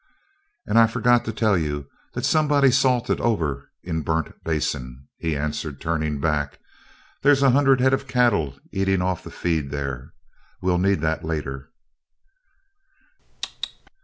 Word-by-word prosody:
"And 115 Hz, -, +3 dB
I 115 Hz, -, +7 dB
fergot 120 Hz, +1 st, +2 dB
to 110 Hz, -, -2 dB
tell 110 Hz, -2 st, +2 dB
you 75 Hz, -4 st, -2 dB, 0.3 s
that -, -, -1 dB
somebody's 145 Hz, -4 st, +4 dB
'salted' 125 Hz, -3 st, +1 dB
over 80 Hz, -, -1 dB
in 80 Hz, -2 st, -2 dB
Burnt 80 Hz, +2 st, -2 dB
Basin," 65 Hz, -5 st, -3 dB
he 80 Hz, -3 st, -1 dB
answered, 75 Hz, -1 st, -3 dB
turning 80 Hz, -3 st, -1 dB
back. 75 Hz, -2 st, -1 dB, 0.6 s
"There's 140 Hz, 0 st, +4 dB
a 135 Hz, -, +6 dB
hunerd 135 Hz, -1 st, +4 dB
head 130 Hz, +1 st, +4 dB
o' 135 Hz, -, +3 dB
cattle 120 Hz, -, +1 dB
eatin' 95 Hz, -2 st, +1 dB
off 95 Hz, 0 st, -1 dB
the -, -, -9 dB
feed 80 Hz, -5 st, -1 dB
there. 70 Hz, -2 st, -5 dB, 0.5 s
We'll 90 Hz, -1 st, +1 dB
need 95 Hz, -3 st, +2 dB
that, 80 Hz, 0 st, -1 dB
later." 75 Hz, -4 st, -4 dB
85 Hz, 135 wpm, -23 LUFS, 75-120 Hz, 0.6 s, I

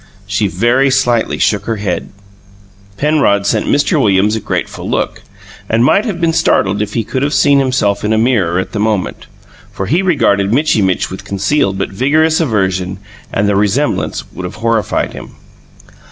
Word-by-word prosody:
She 100 Hz, +1 st, 0 dB
very 120 Hz, +9 st, +2 dB
slightly 125 Hz, -4 st, +1 dB
shook 105 Hz, -2 st, 0 dB
her 115 Hz, -, -1 dB
head. 100 Hz, -4 st, -3 dB, 0.9 s
Penrod 140 Hz, -9 st, +2 dB
sent -, -, 0 dB
Mr. 145 Hz, +1 st, +2 dB
Williams 105 Hz, -1 st, +2 dB
a -, -, -1 dB
grateful -, -, -4 dB
look, -, -, -2 dB, 0.5 s
and 115 Hz, +2 st, +2 dB
might 200 Hz, -, +3 dB
have 200 Hz, -7 st, -3 dB
been 165 Hz, -1 st, +1 dB
startled 100 Hz, -9 st, +1 dB
if 105 Hz, 0 st, -4 dB
he 115 Hz, -, 0 dB
could 130 Hz, +4 st, -3 dB
have 145 Hz, +2 st, 0 dB
seen 140 Hz, -1 st, +4 dB
himself 125 Hz, -7 st, 0 dB
in 105 Hz, -, 0 dB
a 110 Hz, -, +2 dB
mirror 110 Hz, -7 st, +1 dB
at 95 Hz, -, -2 dB
that 105 Hz, -, -4 dB
moment; 105 Hz, -3 st, -2 dB, 0.4 s
for 95 Hz, -, -4 dB
he 165 Hz, -, +1 dB
regarded 100 Hz, -, +1 dB
Mitchy 130 Hz, -3 st, +2 dB
Mitch 95 Hz, -1 st, 0 dB
with 95 Hz, -, -7 dB
concealed 100 Hz, 0 st, 0 dB
but -, -, -3 dB
vigorous 155 Hz, +9 st, +2 dB
aversion 95 Hz, -, -1 dB, 0.3 s
and 100 Hz, -, 0 dB
the 100 Hz, -, +1 dB
resemblance 105 Hz, +9 st, 0 dB
would 90 Hz, -, -8 dB
have 90 Hz, -, -7 dB
horrified 115 Hz, -1 st, -1 dB
him. -, -, -10 dB
110 Hz, 175 wpm, -14 LUFS, 100-135 Hz, 0.9 s, seen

